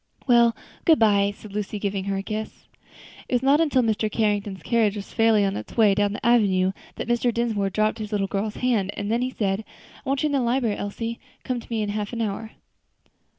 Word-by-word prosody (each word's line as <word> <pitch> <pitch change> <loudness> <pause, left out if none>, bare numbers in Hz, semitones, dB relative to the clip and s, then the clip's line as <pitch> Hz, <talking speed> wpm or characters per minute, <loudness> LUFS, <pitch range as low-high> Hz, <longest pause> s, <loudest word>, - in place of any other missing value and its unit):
"Well, 235 -2 +5 0.3
good 320 -3 +5
bye," 200 -2 +3
said 210 -2 -12
Lucy, 210 0 -3
giving 200 -1 -2
her 195 -1 -1
a 195 - -3
kiss. 215 +1 -6 0.6
It - - +1
was 245 - +1
not 280 +4 +4
until 280 -6 +3
Mr. 215 -1 0
Carrington's 205 -3 -1
carriage 225 -4 +2
was 200 -1 -8
fairly 225 -3 +4
on 195 0 -1
its - - -8
way 215 -3 +5
down 205 0 +1
the - - -6
avenue, 195 -6 +3 0.2
that - - -5
Mr. 240 0 +2
Dinsmore 225 -4 0
dropped 215 +3 0
his 215 0 -5
little 205 -2 0
girl's 200 +2 -3
hand; 230 -7 0
and 205 +1 -2
then 235 +2 +1
he 255 - 0
said, 205 -4 -1 0.4
"I 270 - -5
want 275 +1 0
you - - +3
in - - -3
the 275 - +2
library, 235 -3 +1
Elsie; 230 +3 -4 0.2
come 255 -1 -2
to - - -13
me 225 -2 -1
in 205 - -3
half 210 +2 -3
an 230 - -2
hour." 220 +1 -4
215 Hz, 225 wpm, -24 LUFS, 205-235 Hz, 0.6 s, Well